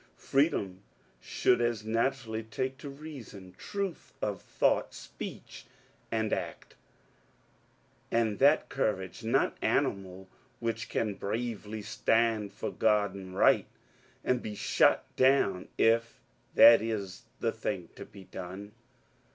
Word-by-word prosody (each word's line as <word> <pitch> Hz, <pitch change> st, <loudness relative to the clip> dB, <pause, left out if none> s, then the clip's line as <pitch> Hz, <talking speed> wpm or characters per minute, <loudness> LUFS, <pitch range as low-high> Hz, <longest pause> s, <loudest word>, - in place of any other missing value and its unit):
Free 140 Hz, +4 st, +3 dB
dom 95 Hz, -, -4 dB, 0.4 s
should 125 Hz, -1 st, +2 dB
as 120 Hz, -3 st, 0 dB
naturally 115 Hz, 0 st, -1 dB
take 130 Hz, +4 st, -4 dB
to 145 Hz, -, -7 dB
reason, 135 Hz, -11 st, -10 dB
truth 200 Hz, -, -5 dB
of 100 Hz, -3 st, -2 dB
thought, -, -, +1 dB
speech, -, -, -9 dB, 0.4 s
and 110 Hz, -1 st, 0 dB
act, -, -, -5 dB, 1.4 s
and 115 Hz, -3 st, +1 dB
that 145 Hz, +3 st, +5 dB
courage 105 Hz, -5 st, -2 dB
not 120 Hz, +5 st, +2 dB
animal 95 Hz, -1 st, -1 dB, 0.3 s
which 115 Hz, -2 st, -3 dB
can 105 Hz, -2 st, -1 dB
bravely 110 Hz, 0 st, -4 dB
stand 110 Hz, 0 st, +1 dB
for -, -, -5 dB
Grod 105 Hz, -3 st, +2 dB
and 95 Hz, -1 st, -9 dB
Right -, -, +4 dB, 0.6 s
and 125 Hz, -1 st, +1 dB
be 105 Hz, -1 st, -6 dB
shot -, -, +3 dB
down 130 Hz, -9 st, +3 dB
if 115 Hz, +1 st, +2 dB, 0.4 s
that 115 Hz, -2 st, +9 dB
is 105 Hz, -4 st, -4 dB
the -, -, +1 dB
thing -, -, -4 dB
to -, -, -8 dB
be 100 Hz, -1 st, -13 dB
done. 95 Hz, +3 st, -8 dB
110 Hz, 120 wpm, -30 LUFS, 100-120 Hz, 1.4 s, that